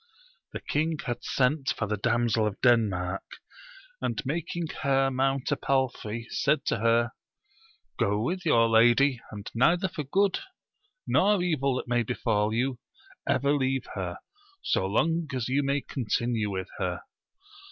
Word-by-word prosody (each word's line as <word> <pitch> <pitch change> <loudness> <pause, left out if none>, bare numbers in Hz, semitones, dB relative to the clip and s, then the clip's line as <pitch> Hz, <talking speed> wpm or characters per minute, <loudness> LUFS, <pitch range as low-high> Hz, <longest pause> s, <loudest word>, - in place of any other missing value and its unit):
The - - -5
king 155 +2 -1
had 120 -2 -3
sent 135 +2 +1
for 105 - -1
the 105 +1 -1
Damsel 115 0 +1
of 105 - -5
Denmark, 100 -6 +2 0.8
and - - -2
making 165 +4 -2 0.2
her 135 -1 +2
mount 135 +1 0
a - - +3
palfrey, 125 -5 -1
said 150 0 +1
to - - 0
her. 115 +1 +2 0.9
Go 105 +1 +1
with 175 - -2
your 115 -8 +4
lady, 120 +3 +4
and 105 -1 -8
neither 170 +10 +3
for 160 -5 -5
good 190 +7 +1 0.7
nor 200 -2 +3
evil 140 -7 +1
that 130 - -4
may 120 0 +2
befal 110 -2 0
you, 125 +2 -1 0.5
ever 140 +1 +2
leave 135 -2 0
her, 90 -3 -4 0.5
so 95 - +1
long 160 - +1
as 125 -3 -2
you 135 +3 +1
may 140 0 0
continue 120 -4 -1
with 95 -1 -4
her. - - -2
125 Hz, 145 wpm, -27 LUFS, 115-140 Hz, 0.9 s, your